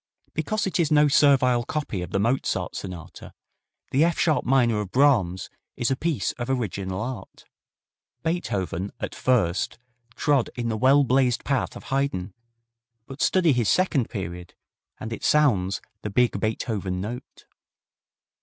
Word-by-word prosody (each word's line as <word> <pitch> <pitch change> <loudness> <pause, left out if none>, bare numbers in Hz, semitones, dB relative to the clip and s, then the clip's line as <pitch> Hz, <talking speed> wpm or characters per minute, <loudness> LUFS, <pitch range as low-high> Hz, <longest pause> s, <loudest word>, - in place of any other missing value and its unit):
Because 215 -1 -1
it 190 -1 -1
is 165 -3 +2
no 150 0 +5
servile 135 -4 +4
copy 130 - -3
of 90 - -5
the - - -1
Mozart 100 -5 -1
Sonata, 90 -4 -8 0.6
the 140 +4 +3
F 170 0 +1
sharp 155 -3 +2
minor 120 -5 +3
of 100 - -6
Brahms 110 -9 +2 0.3
is 120 +1 0
a - - +2
piece 160 +1 -1
of 120 +1 -4
original 100 -7 -2
art. 120 -5 -7 0.8
Beethoven 100 - -2
at - - -4
first 105 -9 0 0.4
trod 145 -5 +1
in 120 -1 -2
the 110 - -1
well 135 +5 +5
blazed 130 -2 +2
path 140 -2 -1
of - - -9
Haydn, 120 -9 -1 0.7
but 135 +3 -9
study 175 -5 +3
his 120 -4 +1
second 160 -10 +2
period, 90 -4 -6 0.4
and 110 +1 -5
it - - -7
sounds 100 -12 +2 0.2
the 105 - -4
big 125 +4 +2
Beethoven 105 -4 -2
note. 120 +7 -7
125 Hz, 145 wpm, -25 LUFS, 100-140 Hz, 0.8 s, no